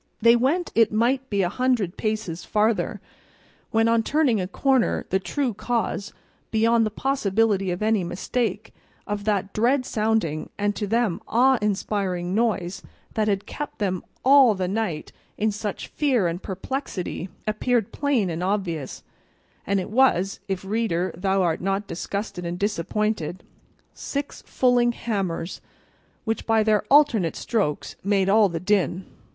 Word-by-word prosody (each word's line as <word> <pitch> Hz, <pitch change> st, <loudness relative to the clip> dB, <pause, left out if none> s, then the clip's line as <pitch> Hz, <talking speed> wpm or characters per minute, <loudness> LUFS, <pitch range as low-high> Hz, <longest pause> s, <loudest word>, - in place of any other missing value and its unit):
They 230 Hz, +1 st, +6 dB
went 285 Hz, +9 st, +1 dB
it 225 Hz, -1 st, +4 dB
might 250 Hz, +5 st, +1 dB
be 200 Hz, -2 st, +1 dB
a -, -, +2 dB
hundred 240 Hz, -5 st, 0 dB
paces 215 Hz, -6 st, -3 dB
farther, 215 Hz, +1 st, 0 dB, 0.7 s
when 225 Hz, 0 st, +2 dB
on 230 Hz, 0 st, +3 dB
turning 260 Hz, -4 st, +2 dB
a 180 Hz, -, -2 dB
corner 260 Hz, +5 st, +1 dB
the 190 Hz, -, +3 dB
true 255 Hz, +5 st, -2 dB
cause, 210 Hz, -2 st, -2 dB, 0.4 s
beyond 225 Hz, 0 st, +3 dB
the -, -, -2 dB
possibility 215 Hz, -5 st, +1 dB
of 180 Hz, +3 st, -2 dB
any 215 Hz, -3 st, +2 dB
mistake, 215 Hz, +5 st, -2 dB, 0.3 s
of 205 Hz, -1 st, -4 dB
that 200 Hz, -2 st, 0 dB
dread 255 Hz, +4 st, +2 dB
sounding 215 Hz, -, 0 dB
and 205 Hz, 0 st, 0 dB
to 205 Hz, -, -3 dB
them 225 Hz, -4 st, 0 dB
awe 255 Hz, +2 st, +4 dB
inspiring 195 Hz, -3 st, -1 dB
noise 200 Hz, -5 st, 0 dB, 0.3 s
that 215 Hz, -1 st, 0 dB
had 200 Hz, -1 st, 0 dB
kept 295 Hz, -1 st, -6 dB
them 185 Hz, -4 st, -1 dB, 0.2 s
all 265 Hz, -5 st, +7 dB
the 185 Hz, -1 st, -2 dB
night 190 Hz, -6 st, -2 dB, 0.3 s
in 215 Hz, +1 st, +1 dB
such 205 Hz, 0 st, -5 dB
fear 255 Hz, -, +1 dB
and 170 Hz, +2 st, -3 dB
perplexity, 190 Hz, -, -4 dB, 0.2 s
appeared 220 Hz, +1 st, 0 dB
plain 260 Hz, -11 st, 0 dB
and 165 Hz, +1 st, -4 dB
obvious; 180 Hz, -7 st, -2 dB, 0.6 s
and 200 Hz, 0 st, +2 dB
it 185 Hz, -, -5 dB
was 215 Hz, -6 st, +3 dB
(if, 190 Hz, -1 st, -3 dB
reader, 190 Hz, -4 st, -1 dB
thou 190 Hz, +2 st, +1 dB
art 165 Hz, -2 st, 0 dB
not 195 Hz, +2 st, -1 dB
disgusted 200 Hz, 0 st, -4 dB
and 170 Hz, 0 st, -3 dB
disappointed) 205 Hz, -2 st, -1 dB, 0.5 s
six 285 Hz, 0 st, -5 dB
fulling 245 Hz, -1 st, +3 dB
hammers 195 Hz, -8 st, -3 dB, 0.6 s
which 225 Hz, 0 st, -2 dB
by 225 Hz, -1 st, +4 dB
their 215 Hz, -1 st, +3 dB
alternate 250 Hz, -, +4 dB
strokes 200 Hz, -11 st, -2 dB
made 195 Hz, -1 st, +2 dB
all 210 Hz, 0 st, +5 dB
the 170 Hz, -1 st, -3 dB
din. 190 Hz, 0 st, 0 dB
210 Hz, 145 wpm, -24 LUFS, 190-230 Hz, 0.7 s, all